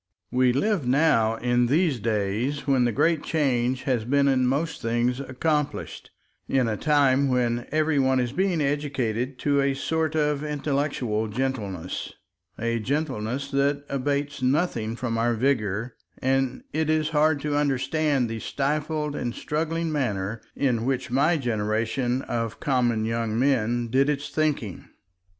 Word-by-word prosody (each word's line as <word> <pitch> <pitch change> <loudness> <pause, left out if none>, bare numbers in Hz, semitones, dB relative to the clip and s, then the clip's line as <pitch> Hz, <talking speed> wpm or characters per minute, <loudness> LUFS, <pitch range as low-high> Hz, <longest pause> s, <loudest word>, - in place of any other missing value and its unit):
We 125 0 +3
live 165 - 0
now 125 -5 +3
in 120 +1 +1
these 150 -1 +2
days, 110 +6 -1
when 135 -3 +3
the 120 - +2
Great 160 +7 +2
Change 130 -5 0
has 125 -5 0
been 140 +4 +2
in 130 -2 +3
most 150 +6 -1
things 120 +2 0
accomplished, 145 +2 -2 0.4
in 130 -3 +2
a 110 - 0
time 140 -1 +3
when 120 -1 0
every 155 -1 +2
one 130 -1 +3
is 120 -1 -1
being 180 +1 0
educated 135 -4 -1
to 140 -1 +2
a 140 0 +1
sort 160 +2 -1
of 150 -1 +1
intellectual 140 -7 -1
gentleness, 105 -7 -3 0.4
a 115 0 -1
gentleness 130 -1 -2
that 140 +1 +1
abates 140 +1 -2
nothing 125 -5 0
from 115 -2 -2
our 120 +1 +2
vigor, 115 -2 0 0.2
and 130 -1 0
it 155 0 0
is 155 0 +2
hard 155 -1 +3
to 150 0 -1
understand 145 -1 +1
the 115 0 -4
stifled 150 +3 -2
and 120 -4 -3
struggling 165 +2 -2
manner 110 -7 -2
in 125 -5 +1
which 130 -1 -1
my 150 +6 +3
generation 120 +1 -1
of 115 -2 -3
common 120 -5 +1
young 115 -1 -1
men 120 -2 +1
did 135 +4 +2
its 145 -1 -2
thinking. 145 - -1
130 Hz, 145 wpm, -25 LUFS, 120-145 Hz, 0.4 s, We